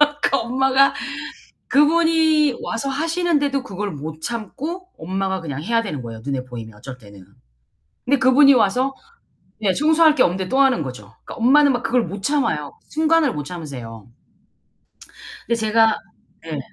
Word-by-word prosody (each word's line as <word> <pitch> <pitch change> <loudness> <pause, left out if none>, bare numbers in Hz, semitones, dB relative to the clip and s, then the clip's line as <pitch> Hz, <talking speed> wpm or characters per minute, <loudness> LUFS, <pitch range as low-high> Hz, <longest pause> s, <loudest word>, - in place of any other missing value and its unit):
그러니까 295 -2 +2
엄마가 265 +3 +2 0.7
그분이 315 -1 +3
와서 230 +5 -3
하시는데도 295 -2 0
그걸 205 -3 -5
못 155 +1 -8
참고 285 - -5
엄마가 190 +2 -3
그냥 145 -3 -5
해야 230 +4 +1
되는 155 - -5
거예요, 115 -2 -8
눈에 135 -1 -3
보이면 115 -4 -9
어쩔 125 +3 -10
때는. 100 -5 -15 0.8
근데 280 +2 +2
그분이 275 +2 +6
와서 250 +4 +1 0.7
예 195 -3 +2
청소할 310 - +4
게 255 - +4
없는데 185 +1 -1
또 265 - +1
하는 265 - +3
거죠. 125 -6 -8 0.2
그러니까 - - -9
엄마는 280 +4 +4
막 245 0 -3
그걸 230 +1 +1
못 195 +4 -7
참아요. 175 - -1 0.2
순간을 315 -3 +2
못 150 - -4
참으세요. 130 - -8 1.4
근데 235 - +1
제가 220 0 +3 0.5
예. 155 -3 -4
235 Hz, 325 characters per minute, -21 LUFS, -, 1.4 s, 그분이